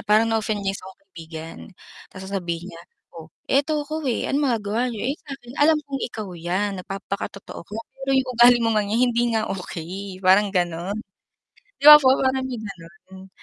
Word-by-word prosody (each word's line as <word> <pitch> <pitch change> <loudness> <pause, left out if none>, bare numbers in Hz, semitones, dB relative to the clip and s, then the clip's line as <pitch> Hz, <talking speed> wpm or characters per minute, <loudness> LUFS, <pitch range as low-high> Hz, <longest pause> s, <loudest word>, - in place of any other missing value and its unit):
parang 215 +2 +3
na-offend 220 -1 -1
niya 195 - 0
yung 195 - -6
isa 185 - -11
kong 190 - -16
kaibigan 165 -1 -9 0.5
ta's 190 -1 -10
sasabihin 180 -2 -4
niya, 165 - -11 0.3
"Oh, 165 -2 -11 0.2
eto 295 +2 +1
ko, 310 +2 -4
eh. 240 - -1
Anong 290 +2 +1
magagawa 225 +1 -1
niyo?" 240 +3 -2
"Eh, - - -8
sa'kin 245 -3 -9
alam 310 +2 +5
kong 275 -1 -5
ikaw 215 -4 -7
yan, 185 +3 -2
nagpapakatotoo 195 +1 -6
ka 210 - -7 0.2
pero 270 0 -5
yung 265 -1 +1
ugali 240 0 +7
mo - - +2
ngang 210 -2 0
yan - - +2
hindi 235 - +1
nga 220 - 0
okey." 185 +1 -7
Parang 195 +3 +5
gano'n. 180 +1 -2 0.9
'Di - - -2
ba 300 - +13
po 265 -3 +4
parang 260 0 +1
may 255 -2 -4
gano'n? 190 0 -12
205 Hz, 190 wpm, -23 LUFS, 185-250 Hz, 0.9 s, ba